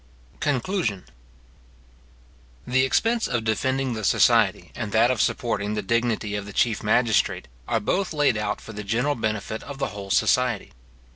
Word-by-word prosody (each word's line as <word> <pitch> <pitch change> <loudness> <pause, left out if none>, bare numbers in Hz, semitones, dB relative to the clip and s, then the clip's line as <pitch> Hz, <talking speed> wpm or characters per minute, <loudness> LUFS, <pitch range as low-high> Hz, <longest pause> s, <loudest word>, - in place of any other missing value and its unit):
CONCLUSION. 130 - -1 1.6
The 130 +1 +2
expense 230 - +1
of 115 -2 -1
defending 130 +4 0
the 110 -1 -5
society, - - +3
and 105 - -5
that 115 +3 +4
of 120 -4 0
supporting 105 -2 -1
the 105 - -2
dignity 115 0 0
of 100 -1 -4
the 100 - -9
chief 115 0 +1
magistrate, 110 -1 +1 0.2
are 115 - +1
both 185 - -1
laid 145 -6 +2
out 105 -1 -2
for 115 - -10
the 105 0 -6
general 120 +8 0
benefit 110 -2 -3
of 140 -1 -8
the 135 -1 -2
whole 100 -1 -8
society. 125 +1 +1
115 Hz, 155 wpm, -24 LUFS, 105-130 Hz, 1.6 s, that